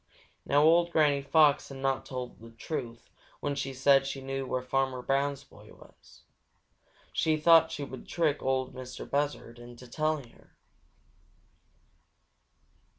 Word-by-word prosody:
Now 145 +1 +4
old 170 +2 +4
Granny 150 -4 +3
Fox 145 0 +3
had 135 - -8
not 135 0 -1
told 125 -2 -6
the 115 +1 -12
truth 115 0 -7 0.3
when 145 - -2
she 140 -1 -3
said 135 +1 +3
she 140 - -4
knew 135 0 -4
where 125 0 -2
Farmer 130 -1 -1
Brown's 140 +1 -1
boy - - -18
was. - - -19 0.9
She 155 -1 +1
thought 160 +1 +5
she 145 - -5
would 130 -2 -9
trick 155 -4 0
Ol' 130 -1 -1
Mistah 130 -1 -8
Buzzard 140 -4 -3
into 120 +1 -12
telling 155 -1 -2
her. - - -24
135 Hz, 140 wpm, -29 LUFS, 130-150 Hz, 0.9 s, thought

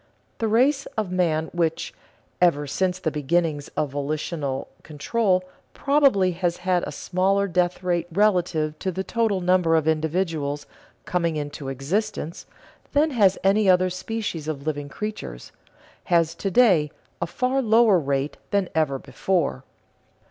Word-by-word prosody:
The 225 - 0
race 265 +6 +2
of 210 -4 -1
man 165 -3 0
which, 165 -2 -1 0.5
ever 150 -5 +3
since 180 +5 -1
the 160 -4 -2
beginnings 150 0 0
of 150 -3 0
volitional 145 -1 -3
control, 185 +5 0 0.3
probably 275 -10 +3
has 175 0 -1
had 180 -1 0
a - - -5
smaller 195 +2 0
death 180 0 0
rate 175 -2 0
relative 175 -6 +1
to 190 - -2
the 190 +2 -3
total 220 -3 0
number 180 -2 +3
of 160 -1 +1
individuals 160 -2 -1 0.4
coming 170 -3 0
into 145 -2 -5
existence 155 - -3 0.5
than 300 +2 +3
has 200 -7 +3
any 195 +1 +3
other 185 0 +4
species 185 -4 -4
of 145 -2 -4
living 145 -2 -3
creatures, 140 - -6 0.5
has 165 -2 +2
to 195 - -3
day 185 - +4 0.3
a 170 - 0
far 255 +9 0
lower 220 -4 +5
rate 140 -1 -2
than 200 -3 0
ever 155 -4 +1
before. 170 -2 -1
175 Hz, 140 wpm, -24 LUFS, 155-195 Hz, 0.5 s, lower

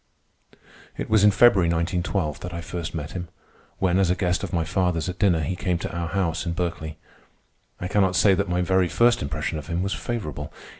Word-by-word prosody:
It - - -5
was 110 -2 +5
in 105 - +8
February, 100 -3 +5
1912, 85 -1 -1
that 90 -1 -6
I 85 - -4
first 85 -1 -5
met 75 -2 -4
him, 90 -1 -5 0.5
when, 95 0 +2
as 95 -3 +3
a 90 - +3
guest 90 -1 0
of - - -4
my 85 -2 +1
father's 90 -1 0
at 90 0 -5
dinner, 90 -6 +3
he 85 +5 -2
came 90 -1 -1
to 85 - -5
our 85 0 -2
house 90 -2 -1
in 85 - -2
Berkeley. 85 -3 -3 0.8
I 90 - -3
cannot 95 -2 +2
say 95 +4 +5
that 100 0 0
my 90 0 +1
very 95 0 +2
first 120 +5 +3
impression 75 +2 -3
of 75 - -10
him 85 +2 -1
was 100 - -1
favorable. 75 - -4
90 Hz, 210 wpm, -24 LUFS, 85-95 Hz, 0.8 s, in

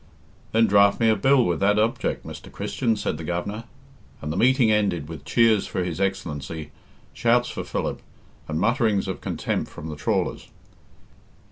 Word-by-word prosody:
"Then 115 +1 +4
draft 100 -1 +4
me 115 -1 +4
a 110 - +4
bill 130 +4 +4
with 85 -2 0
that 100 +1 +3
object, 110 +2 0
Mr. - - -9
Christian," 115 -3 -1
said 90 -7 -3
the - - -6
Governor, 90 +7 -3 0.5
and 75 +1 -4
the - - -5
meeting 125 +2 +4
ended 100 -8 +1
with 80 -1 -9
cheers 115 -3 +3
for 90 - -2
His 90 +1 -4
Excellency, 80 -5 -3 0.4
shouts 120 +1 +2
for - - -5
Philip, - - -3 0.5
and 80 0 -2
mutterings 110 - +1
of 95 - -4
contempt - - -2
from 80 - -8
the 75 - -5
trawlers. 75 - -1
100 Hz, 165 wpm, -24 LUFS, 85-115 Hz, 0.5 s, Then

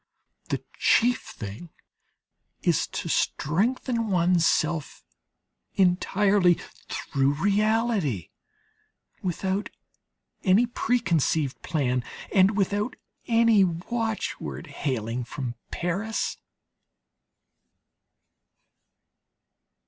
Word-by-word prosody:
The - - -2 0.2
chief 245 +1 +4
thing 105 - -8 0.9
is - - +2
to - - -5
strengthen 230 - 0
one's 175 -2 +3
self 160 -1 -1 0.7
entirely 190 0 +3 0.3
through 135 0 0
reality, 205 - +1 0.9
without 190 +2 -2 0.7
any 200 +5 +5
pre 245 +1 0
conceived 160 - 0
plan 130 -6 0 0.3
and 195 +1 +4
without 205 +4 0 0.3
any 230 -3 +5
watchword 215 +3 -3
hailing 125 -5 -3
from 125 0 -5 0.2
Paris. 195 +6 -2
185 Hz, 70 wpm, -26 LUFS, 150-220 Hz, 0.9 s, any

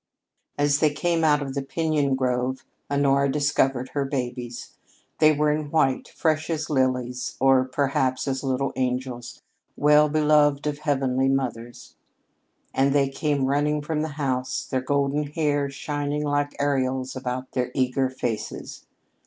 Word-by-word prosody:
As 145 0 +2
they 155 - +4
came 165 +2 0
out 150 -2 +3
of 135 -1 -5
the 140 - -2
piñon 145 -1 0
grove, 130 0 -1 0.2
Honora 140 -1 +2
discovered 135 -3 +1
her 140 - -1
babies. 125 -3 -4 0.5
They 155 0 +6
were 150 0 +2
in 150 -1 -2
white, 140 -4 +1
fresh 155 -1 0
as 155 -1 -2
lilies, 125 -2 -1
or, 135 -1 +4
perhaps, 130 -1 0
as 135 0 -2
little 135 0 -1
angels, 125 -1 -3 0.3
well 150 +1 +5
beloved 150 -1 +3
of 150 -1 -2
heavenly 135 -3 +1
mothers; 120 -3 -3 0.8
and 135 +1 +2
they 140 -1 +3
came 140 0 0
running 145 +2 +1
from 150 0 -2
the 155 -1 -3
house, 130 -3 -1
their 130 - -1
golden 140 +2 0
hair 145 -2 0
shining 145 +1 -3
like 145 0 -1
aureoles 130 -2 0
about 130 0 -4
their 125 -1 -1
eager 130 0 +1
faces. 120 -4 -5
140 Hz, 145 wpm, -24 LUFS, 130-150 Hz, 0.8 s, They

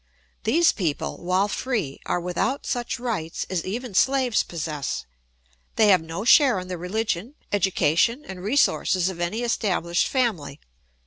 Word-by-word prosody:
These 325 +10 +4
people, 165 -8 -2
while 185 +3 +2
free, 210 - -2
are - - 0
without 180 +10 -2
such 240 -1 -2
rights 210 -10 -3
as 180 -3 -1
even 230 +3 -5
slaves 260 +2 +3
possess; 150 - -4 0.7
they 215 -2 +5
have 185 -3 +5
no 165 +6 -6
share 260 -2 +6
in 185 0 -8
the 180 - -3
religion, 215 - -2 0.2
education, 195 - +2
and 190 -8 -8
resources 195 -6 +2
of 180 -2 -7
any 175 +7 -2
established 185 -7 0
family. 205 - -1
195 Hz, 140 wpm, -24 LUFS, 170-240 Hz, 0.7 s, share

